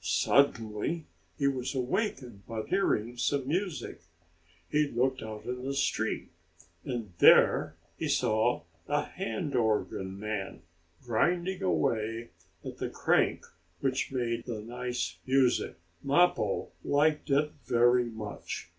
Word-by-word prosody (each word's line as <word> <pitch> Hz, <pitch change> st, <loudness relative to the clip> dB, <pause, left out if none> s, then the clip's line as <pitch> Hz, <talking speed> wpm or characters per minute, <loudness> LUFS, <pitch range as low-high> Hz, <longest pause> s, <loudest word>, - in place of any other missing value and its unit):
Suddenly 140 Hz, +3 st, +1 dB, 0.3 s
he 140 Hz, -2 st, +2 dB
was 130 Hz, 0 st, -1 dB
awakened 130 Hz, -, -2 dB
by 110 Hz, -1 st, -3 dB
hearing 120 Hz, -, 0 dB
some 135 Hz, +1 st, 0 dB
music. 180 Hz, +2 st, -2 dB, 0.7 s
He 150 Hz, 0 st, +2 dB
looked 130 Hz, 0 st, 0 dB
out 110 Hz, -1 st, -7 dB
in 125 Hz, +1 st, -4 dB
the 135 Hz, +1 st, -2 dB
street, -, -, -1 dB, 0.5 s
and 115 Hz, -7 st, -4 dB
there -, -, +6 dB, 0.2 s
he -, -, -1 dB
saw 110 Hz, -1 st, +2 dB, 0.2 s
a 145 Hz, +1 st, +1 dB
hand 175 Hz, -6 st, -4 dB
organ 105 Hz, -4 st, 0 dB
man 105 Hz, -5 st, -4 dB, 0.4 s
grinding 175 Hz, -, 0 dB
away 115 Hz, -, 0 dB, 0.4 s
at -, -, -7 dB
the -, -, -2 dB
crank -, -, +1 dB, 0.4 s
which 130 Hz, -2 st, 0 dB
made 120 Hz, -2 st, -2 dB
the 115 Hz, -4 st, -4 dB
nice 120 Hz, -7 st, -3 dB
music. 130 Hz, -2 st, +2 dB, 0.3 s
Mappo 140 Hz, -, +2 dB
liked 150 Hz, +1 st, +2 dB
it 145 Hz, +2 st, +2 dB, 0.2 s
very 120 Hz, 0 st, +4 dB
much. 110 Hz, -3 st, -6 dB
125 Hz, 120 wpm, -30 LUFS, 110-145 Hz, 0.7 s, there